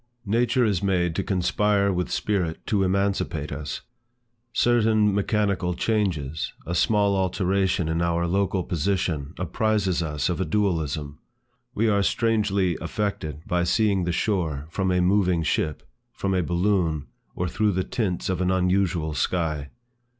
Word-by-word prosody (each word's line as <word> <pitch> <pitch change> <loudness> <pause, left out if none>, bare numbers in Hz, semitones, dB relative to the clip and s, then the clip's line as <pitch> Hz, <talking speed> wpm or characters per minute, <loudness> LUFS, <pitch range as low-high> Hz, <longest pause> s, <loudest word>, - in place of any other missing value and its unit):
Nature 120 +4 +2
is 100 -6 +1
made 90 -4 +1
to - - -1
conspire 100 +1 +1
with 90 0 -1
spirit 90 -6 -1
to 105 -3 +1
emancipate 95 -5 0
us. 75 0 -5 0.7
Certain 110 -3 +3
mechanical 100 -3 0
changes, 85 -10 -1
a 85 - -3
small 100 +2 +2
alteration 95 -1 +1
in 80 +1 0
our 85 0 +1
local 95 +1 0
position 85 -4 -1
apprizes 95 0 0
us 75 -3 -1
of 90 +1 -1
a - - +3
dualism. 80 -8 -1 0.6
We 115 +2 +2
are 100 -2 +3
strangely 100 -5 +1
affected 85 - -3
by 90 0 0
seeing 100 -1 +2
the 90 - 0
shore 85 -7 -1
from 95 +1 0
a 90 0 +2
moving 90 -2 +2
ship, 75 0 -1 0.3
from 95 -1 -2
a 90 - +2
balloon, 85 -3 0 0.3
or 90 - -1
through 105 +3 +1
the 95 +1 0
tints 95 -6 -2
of 95 -1 -1
an 90 - +1
unusual 90 -3 +1
sky. 75 -4 -1
95 Hz, 145 wpm, -25 LUFS, 85-100 Hz, 0.7 s, Certain